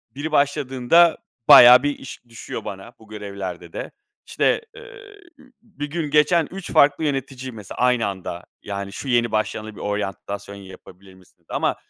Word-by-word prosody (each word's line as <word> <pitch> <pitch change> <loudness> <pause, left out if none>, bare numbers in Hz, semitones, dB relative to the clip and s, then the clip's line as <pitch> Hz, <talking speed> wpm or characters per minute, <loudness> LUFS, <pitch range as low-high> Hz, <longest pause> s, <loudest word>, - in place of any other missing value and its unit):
biri 150 +3 -5
başladığında 140 +3 +3 0.3
bayağı 125 +1 +9
bir 145 0 -2
iş 135 - -10
düşüyor 115 - -8
bana 95 +4 -8
bu 110 - -18
görevlerde 100 -5 -7
de. - - -6 0.4
İşte, - - +1
emm, - - -11 0.8
bir 195 -11 -8
gün 155 -2 -3
geçen 150 +2 +3
3 190 -1 -8
farklı 145 +2 +4
yönetici 135 -3 -3
mesela 105 -5 -10
aynı 125 -3 +2
anda. 95 -2 -6 0.2
Yani, 100 -1 -5
"Şu 135 - -7
yeni 120 -2 +2
başlayanla 110 0 -3
bir - - -12
oryantasyon 100 0 -5
yapabilir 95 0 -14
misin?" 95 -1 -22
dedi. - - -39
Ama - - -1
120 Hz, 155 wpm, -22 LUFS, 100-145 Hz, 0.8 s, bayağı